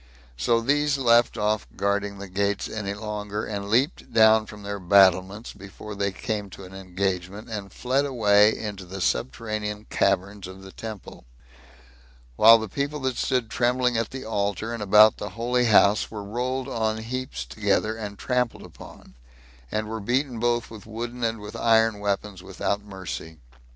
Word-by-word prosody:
So 115 - +1
these 145 +3 +2
left 120 -2 +4
off 105 0 0
guarding 100 0 -1
the 100 0 -8
gates 100 +2 -1
any 100 -2 -4
longer, 105 0 -4
and 100 -1 -5
leaped 130 - +1
down 110 -1 +5
from 105 -1 -11
their 100 0 -4
battlements 95 +2 +3
before 100 +2 -10
they 100 0 -1
came 105 +1 -4
to 95 - -11
an 95 0 -11
engagement, 95 +2 -3
and 100 -2 -5
fled 130 +3 0
away 105 -6 +4
into 105 -3 -6
the 95 +2 -8
subterranean 105 - -2
caverns 100 0 0
of 95 +1 -11
the 95 - -11
temple; 110 - -9 1.1
while 115 - +8
the 110 -1 -4
people 145 +7 -3
that 130 -1 -1
stood 125 -4 -1
trembling 125 0 +1
at 115 -1 0
the 130 0 -7
altar, 105 +1 -2
and 115 - -5
about 105 +2 +6
the 105 - -5
holy 125 +1 +1
house, 105 -2 +4
were 105 -2 -7
rolled 125 +5 -3
on 110 -4 -1
heaps 115 - -5
together, 105 - 0
and 105 -2 -7
trampled 125 0 -1
upon, - - -14 0.6
and 110 0 -2
were 110 +1 -4
beaten 125 +3 -1
both 120 0 0
with 110 -1 -11
wooden 120 +2 -5
and 115 -1 0
with 105 0 -9
iron 110 -2 +3
weapons 100 -1 -2
without 95 +2 -2
mercy. 95 -5 -7
105 Hz, 165 wpm, -25 LUFS, 100-115 Hz, 1.1 s, while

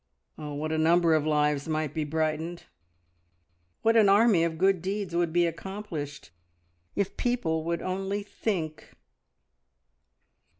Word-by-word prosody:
Oh, 150 -1 -6
what 155 +2 -3
a 160 - 0
number 165 +1 +4
of 155 -1 +2
lives 150 -1 +1
might 155 -2 -1
be 155 - -1
brightened, 160 +2 -2 1.2
what 225 +1 +4
an 215 -3 +6
army 200 -3 +5
of 165 -1 -1
good 190 0 +3
deeds 195 -1 -3
would 170 -1 +1
be 175 +1 +3
accomplished 165 - -6 0.6
if 200 -1 -1
people 175 -11 0
would 170 0 -2
only 195 +2 -2
"think!" 175 -7 -4
170 Hz, 130 wpm, -28 LUFS, 155-195 Hz, 1.2 s, an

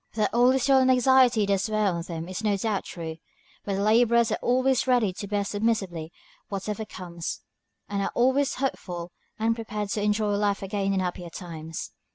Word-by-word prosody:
That 215 - 0
all 245 +2 +5
this 265 -1 +1
toil 270 -1 +5
and 260 0 +3
anxiety 255 -3 +5
does 200 +1 0
wear 215 0 +1
on 175 -4 0
them 165 -1 -6
is 185 +4 -5
no 205 -2 +2
doubt 205 0 -1
true, 160 -2 -6 0.5
but 200 - -2
the 200 - -1
laborers 235 +1 +4
are - - -1
always 255 +1 +2
ready 240 -7 +3
to 200 - -6
bear 205 0 -1
submissively 195 -7 -1 0.4
whatever 210 +2 -3
comes, 175 -5 -6 0.5
and 200 -1 -2
are - - -1
always 265 +3 +2
hopeful 180 -10 -3 0.3
and 225 +1 +2
prepared 210 -3 -4
to 205 - -1
enjoy 210 0 +1
life 205 -1 0
again 195 0 -1
in 190 - +1
happier 180 -1 -4
times. 165 -2 -7
210 Hz, 190 wpm, -26 LUFS, 185-235 Hz, 0.5 s, all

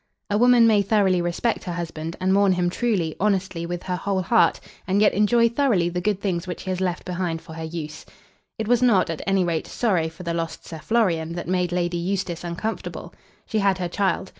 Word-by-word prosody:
A 205 - +3
woman 245 -1 +6
may 215 -3 +5
thoroughly 195 -3 +2
respect 175 +7 -1
her 175 - -3
husband, 165 -1 -5
and 185 +1 +2
mourn 200 -1 +4
him 175 -1 0
truly, 190 -7 0
honestly, 190 -4 0
with 175 0 -4
her 180 -1 -2
whole 190 +1 -1
heart, 230 +6 +3 0.3
and 195 +1 +2
yet 210 - +4
enjoy 230 +3 +4
thoroughly 230 -8 +1
the 180 +1 -3
good 205 0 0
things 185 -3 -2
which 180 - -5
he 190 - -3
has 185 0 -2
left 180 -2 -2
behind 180 -2 -2
for 160 - -11
her 160 0 -6
use. 160 -2 -6 0.5
It 220 - -3
was 245 +1 +3
not, 200 -8 +3
at 165 - -5
any 195 -1 +3
rate, 170 -2 -1
sorrow 180 -9 0
for 165 +3 -12
the 170 -1 -2
lost 165 -1 -4
Sir 160 - -8
Florian 170 -6 0
that 175 - -5
made 180 -1 0
Lady 175 0 -1
Eustace 180 -1 -2
uncomfortable. 175 +6 -5 0.3
She 220 - -1
had 195 -2 +2
her 180 -1 -2
child. 190 +1 -1
185 Hz, 215 wpm, -23 LUFS, 170-205 Hz, 0.5 s, woman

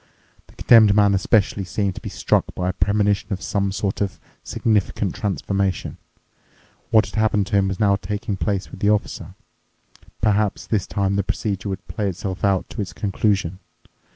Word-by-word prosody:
The - - -20
Condemned 110 -4 +6
Man 100 -1 +5
especially 100 0 +2
seemed 95 +1 -1
to - - -9
be - - -6
struck - - +1
by 90 0 -1
a - - -1
premonition 100 +2 +1
of 95 - -3
some 100 -1 0
sort 100 +1 -2
of 100 -2 -2 0.2
significant 105 -3 0
transformation. 100 -3 -2 0.9
What 110 -1 +5
had - - -11
happened 105 -2 +2
to 105 - -1
him 95 -1 +3
was 95 -1 -3
now 100 -2 +3
taking 105 0 -4
place 100 0 -2
with - - -10
the 100 - +2
Officer. 105 -1 -1 0.8
Perhaps 105 -1 +1
this 105 -5 -1
time 100 -1 0
the 100 - +1
procedure 100 0 -3
would 95 - -6
play 105 -3 -2
itself 95 +1 -5
out 100 -2 +2
to 110 - -4
its 95 - -5
conclusion. 95 -3 -1
100 Hz, 175 wpm, -22 LUFS, 95-105 Hz, 0.9 s, Condemned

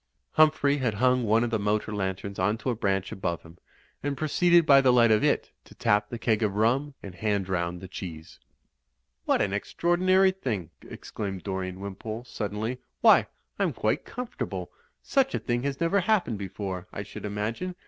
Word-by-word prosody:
Humphrey 155 -2 +4
had 120 -5 0
hung 125 +3 +3
one 110 +2 +3
of 120 - -2
the 110 - +1
motor 105 +1 -1
lanterns 95 0 -3
onto 105 +7 0
a - - -2
branch 95 -3 -1
above 85 -3 -3
him, 85 +1 -16 0.4
and 140 -1 -2
proceeded 170 +2 +4
by 140 -2 +7
the 130 -2 +5
light 120 -2 +5
of 105 -1 +3
it - - +1
to - - -16
tap 105 0 +1
the 120 - -5
keg 115 -1 +1
of 105 -3 0
rum 130 +7 +1
and 95 - -8
hand 100 0 -1
round 90 -1 -2
the 95 - -8
cheese. 85 -4 -8 0.9
What - - +2
an 100 - -2
extraordinary 185 - +2
thing," 110 - -4
exclaimed 95 -3 -6
Dorian 95 -1 -4
Wimpole, 105 +4 -6
suddenly. 110 +1 -4 0.2
"Why, - - +6 0.3
I'm - - +1
quite - - 0
comfortable! 250 0 -5 0.3
Such 270 -1 +1
a - - 0
thing 120 -1 -1
has 140 +1 -3
never 170 +4 +2
happened 185 - +1
before, 95 -1 -5
I 100 - -5
should - - -10
imagine. 110 - -3
110 Hz, 180 wpm, -27 LUFS, 100-140 Hz, 0.9 s, by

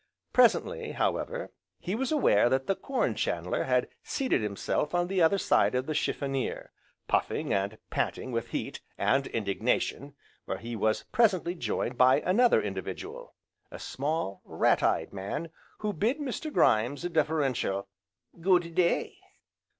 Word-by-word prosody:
Presently, - - +3
however, - - -2 0.3
he 185 - -4
was 260 +5 -1
aware 120 - +4
that 130 +1 +1
the 195 - +2
Corn 270 +6 -1
chandler - - -1
had - - +2
seated 265 - 0
himself 105 - -1
on 175 0 +2
the 185 0 0
other 165 +4 +5
side 185 - +3
of 130 +1 0
the 155 - -2
chiffonier, 135 -3 -2 0.4
puffing, - - 0
and 100 +2 -1
panting 130 - -2
with 115 -1 -2
heat, - - -4 0.2
and 135 0 +2
indignation, 115 +6 -1 0.3
where 95 - -3
he 115 +4 -6
was 110 0 +1
presently 190 -7 +3
joined 125 -7 -3
by 130 +3 +6
another 235 +7 +4
individual, - - -6 0.3
a - - -8
small, 140 - -3
rat - - +2
eyed - - +1
man, 100 +12 -4 0.3
who 210 -1 -2
bid 220 - +1
Mr. 295 +1 -4
Grimes 125 - +2
a - - -1
deferential 140 - 0 0.5
"Good 175 -2 +3
day!" 175 0 +1
155 Hz, 140 wpm, -29 LUFS, 120-195 Hz, 0.5 s, by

